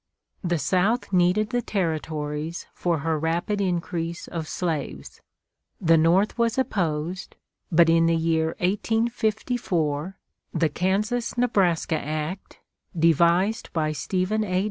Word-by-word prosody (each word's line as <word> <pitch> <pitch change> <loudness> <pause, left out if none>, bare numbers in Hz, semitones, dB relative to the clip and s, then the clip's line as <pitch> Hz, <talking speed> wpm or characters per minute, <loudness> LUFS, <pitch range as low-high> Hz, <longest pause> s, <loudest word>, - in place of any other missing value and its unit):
The 175 -1 +1
South 190 - +1
needed 185 +5 +3
the 245 -1 +1
Territories 160 -4 -3
for 170 -4 -1
her 160 -1 +1
rapid 170 +6 -1
increase 170 -2 -2
of 165 -2 -5
slaves. 150 - -4 0.6
The 165 -2 +4
North 175 +8 +3
was 235 0 +1
opposed; 180 -7 -2 0.4
but 170 0 +6
in 165 0 +4
the 165 - +3
year 160 0 +1
1854 210 - 0 0.4
the 160 - +2
Kansas 210 +10 -1
Nebraska 180 -9 +2
Act, 155 +5 -5 0.4
devised 170 +6 +3
by 155 -2 0
Stephen 185 +8 -1
A. 185 -3 0
175 Hz, 115 wpm, -25 LUFS, 160-200 Hz, 0.6 s, but